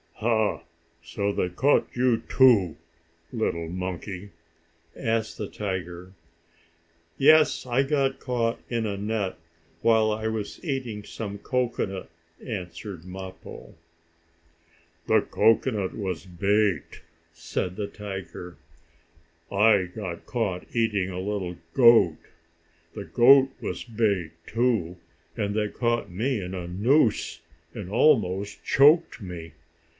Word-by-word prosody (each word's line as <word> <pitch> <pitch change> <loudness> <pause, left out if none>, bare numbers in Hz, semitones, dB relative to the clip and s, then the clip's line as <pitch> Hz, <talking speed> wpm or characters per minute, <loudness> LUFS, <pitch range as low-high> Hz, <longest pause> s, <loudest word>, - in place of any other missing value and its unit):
"Ha! 110 -1 +1 0.4
So 100 +4 -2
they 90 - -1
caught 135 +11 +2
you 125 -1 +2
too, 110 - +4 0.6
little 85 -8 -2
monkey?" 95 +2 -5 0.6
asked 115 -2 -1
the 105 - -4
tiger. 95 -3 -5 1.0
"Yes, 155 +1 +5
I 125 +1 +2
got 135 -1 0
caught 120 -2 -1
in 115 -2 -1
a 100 -2 -2
net, 105 -1 -2 0.4
while 110 -1 +4
I 110 +1 -2
was 110 -2 -4
eating 130 - -3
some 100 -1 -6
cocoanut," 120 -5 -2 0.3
answered 95 -4 -6
Mappo. 95 0 -9 1.3
"The - - +4
cocoanut 110 -3 +1
was 95 -6 -4
bait," 100 -1 0 0.3
said 90 0 -4
the 105 0 -3
tiger. 95 -4 -8 0.9
"I 100 -1 +4
got 90 -2 -7
caught 100 -7 -2
eating 105 -5 +1
a 90 -1 -5
little 95 -3 -3 0.2
goat. 115 -10 +6 0.8
The 100 -2 -7
goat 135 +2 +6
was - - -4
bait, 105 -8 0
too, 110 -7 0 0.4
and 100 -1 -2
they 105 -1 +1
caught 120 -1 -1
me 115 +6 -1
in 90 +1 -6
a 90 -2 -5
noose 110 - +1 0.3
that 105 -5 -6
almost 105 -5 +2
choked 145 -1 +4
me. 85 -5 -8
105 Hz, 110 wpm, -26 LUFS, 95-115 Hz, 1.3 s, goat